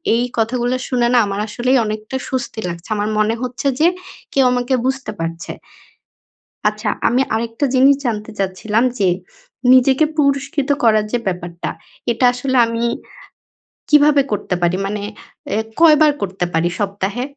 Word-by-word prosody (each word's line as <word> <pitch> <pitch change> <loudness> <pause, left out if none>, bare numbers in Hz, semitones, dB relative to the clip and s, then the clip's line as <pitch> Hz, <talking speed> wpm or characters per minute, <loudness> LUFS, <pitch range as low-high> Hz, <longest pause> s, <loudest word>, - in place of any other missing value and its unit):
এই 235 - +1
কথাগুলা 240 +2 0
শুনে 245 -2 +1
না - - +5
আমার 200 0 -3
আসলেই 250 +5 +1
অনেকটা 215 +3 -5
স্বস্তি 255 -3 -3
লাগছে। 170 0 -7
আমার 210 +1 -1
মনে 215 +1 +2
হচ্ছে 255 +2 -3
যে 320 - +5 0.5
কেউ 270 - +4
আমাকে 250 +1 0
বুঝতে 265 -3 -2
পারছে। 165 +1 -4 1.2
আচ্ছা, 210 +1 -4 0.2
আমি 250 +3 +2
আরেকটা 230 +4 -2
জিনিস 270 +2 +6
জানতে 220 -2 -2
চাচ্ছিলাম 200 +4 0 0.2
যে 195 - +3 0.7
নিজেকে 265 +3 +5
পুরস্কৃত 280 -1 0
করার 215 -2 +4
যে 245 - +1
ব্যাপারটা 175 -2 -4 0.4
এটা 235 +2 +1
আসলে 260 +1 -1
আমি 230 0 -3 1.1
কীভাবে 295 -1 +5
করতে 200 -3 -1
পারি? 175 +1 +2
মানে 205 +1 -3 0.6
এ - - +1 0.2
কয়বার 310 -2 +6
করতে 190 -2 -2
পারি 165 +2 +1
সপ্তাহে? 205 +3 -2
230 Hz, 140 wpm, -18 LUFS, 205-265 Hz, 1.2 s, জিনিস